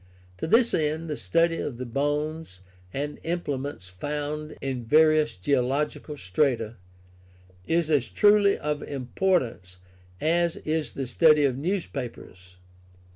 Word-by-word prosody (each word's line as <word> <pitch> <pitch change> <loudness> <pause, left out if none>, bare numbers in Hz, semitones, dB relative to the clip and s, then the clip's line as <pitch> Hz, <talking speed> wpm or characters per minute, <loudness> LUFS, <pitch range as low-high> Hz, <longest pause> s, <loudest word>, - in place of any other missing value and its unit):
To - - -2
this 230 +6 +4
end 155 +1 0
the - - -1
study 165 - +1
of 130 -6 -4
the 130 - -5
bones 145 - -2 0.3
and 145 +5 -4
implements 145 - -3
found 150 +10 -5
in 130 -3 -3
various 155 +4 +4
geological 140 - -1
strata 115 +3 0 0.9
is 165 -1 +1
as 140 -5 +2
truly 205 -1 +4
of 150 0 -2
importance 125 - -1 0.4
as 170 +1 +1
is 155 0 -1
the 135 - -3
study 150 +3 +5
of 130 -3 +1
newspapers. 130 - -5
150 Hz, 120 wpm, -26 LUFS, 125-160 Hz, 0.9 s, study